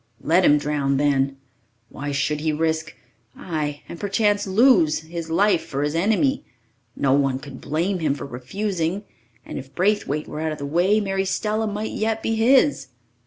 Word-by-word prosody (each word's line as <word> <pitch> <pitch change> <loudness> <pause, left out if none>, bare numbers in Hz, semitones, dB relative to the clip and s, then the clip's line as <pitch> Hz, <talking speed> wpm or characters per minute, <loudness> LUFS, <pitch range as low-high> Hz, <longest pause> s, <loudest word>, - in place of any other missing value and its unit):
Let 170 +4 +3
him 150 -3 +6
drown, 145 -2 0
then! 135 -1 +1 0.5
Why 145 +1 -5
should 145 +1 0
he 155 +1 0
risk 160 0 -1 0.4
ay, 150 -4 -4
and 170 - -9
perchance 205 0 +1
lose 190 - +4
his 165 0 -7
life 190 +2 +3
for 140 +1 -3
his 145 0 -1
enemy? 220 - +1 0.5
No 135 -1 +2
one 135 -2 +2
could 135 -1 -10
blame 175 +6 -1
him 150 -4 0
for - - -7
refusing 170 - -3 0.4
and - - -6
if 135 0 -12
Braithwaite 185 -6 0
were 150 - -6
out 160 -1 -1
of - - -7
the 140 - -5
way, 175 +8 +2
Mary 195 -2 -1
Stella 215 +3 -1
might 210 +1 -3
yet 220 0 -1
be 225 - 0
his! 255 +6 +3
160 Hz, 170 wpm, -23 LUFS, 145-205 Hz, 0.5 s, him